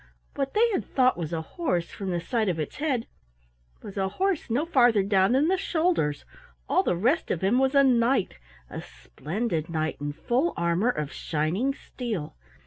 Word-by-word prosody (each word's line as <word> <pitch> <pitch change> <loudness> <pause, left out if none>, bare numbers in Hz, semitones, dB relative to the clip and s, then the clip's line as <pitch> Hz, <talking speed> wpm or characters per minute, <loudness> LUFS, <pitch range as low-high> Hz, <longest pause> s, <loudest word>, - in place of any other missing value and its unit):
What 275 +3 -3
they 455 +3 +5
had 390 - 0
thought 255 -1 +2
was 165 -2 -5
a 165 -1 -2
horse 180 - -2
from 195 -2 -5
the 175 -1 -1
sight 220 +3 -1
of 170 -3 -2
its 155 - -4
head, 270 -6 -1 0.8
was 200 - -9
a 190 -1 0
horse 370 - -1
no 255 +8 +1
farther 245 - +4
down 195 +2 +3
than 280 +4 +3
the 380 +2 +2
shoulders, 335 - 0 0.4
all - - +3
the - - 0
rest 255 - +1
of 165 - -1
him 205 +7 +3
was 265 +1 +2
a 275 - +7
Knight, 240 - +2 0.3
a - - -7
splendid 155 - -4
knight 155 -1 -2
in 145 0 -3
full 255 - 0
armor 170 +7 +1
of 150 - -2
shining 175 - -1
steel. 220 - -5
225 Hz, 185 wpm, -26 LUFS, 170-270 Hz, 0.8 s, a